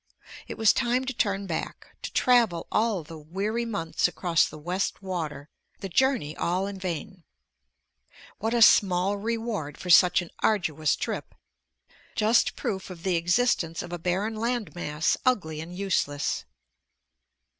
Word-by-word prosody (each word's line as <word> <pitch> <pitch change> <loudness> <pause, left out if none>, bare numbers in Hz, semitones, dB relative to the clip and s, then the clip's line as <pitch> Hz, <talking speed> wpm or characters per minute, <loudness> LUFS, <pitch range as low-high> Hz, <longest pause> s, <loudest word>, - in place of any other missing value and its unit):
It - - -7
was 220 -2 +5
time 250 +1 0
to 265 - -3
turn 200 -4 0
back, 165 -4 -5
to - - -5
travel 235 -10 +3
all 215 -6 +1
the 160 +1 -10
weary 200 +9 -2
months 200 -9 0
across 175 -2 +1
the - - -10
West 180 +6 -3
Water, 155 -6 -4 0.3
the 195 - -5
journey 240 - +1
all 180 +3 0
in 200 -1 -6
vain. 180 0 -5 1.2
What 225 +2 -1
a 235 - +6
small 195 -1 +4
reward 220 -8 -3
for 180 - -3
such 180 +1 +6
an 170 - -13
arduous 160 -8 +1
trip... - - -5 0.8
just 220 +2 +3
proof 190 -1 -4
of 175 -2 -10
the 185 -2 +1
existence 170 -1 +1
of 175 0 -8
a 175 - -4
barren 190 +6 -1
land 235 0 -2
mass, 155 -3 0
ugly 160 - 0
and 175 +2 -8
useless. 145 - -1
185 Hz, 145 wpm, -27 LUFS, 165-220 Hz, 1.2 s, a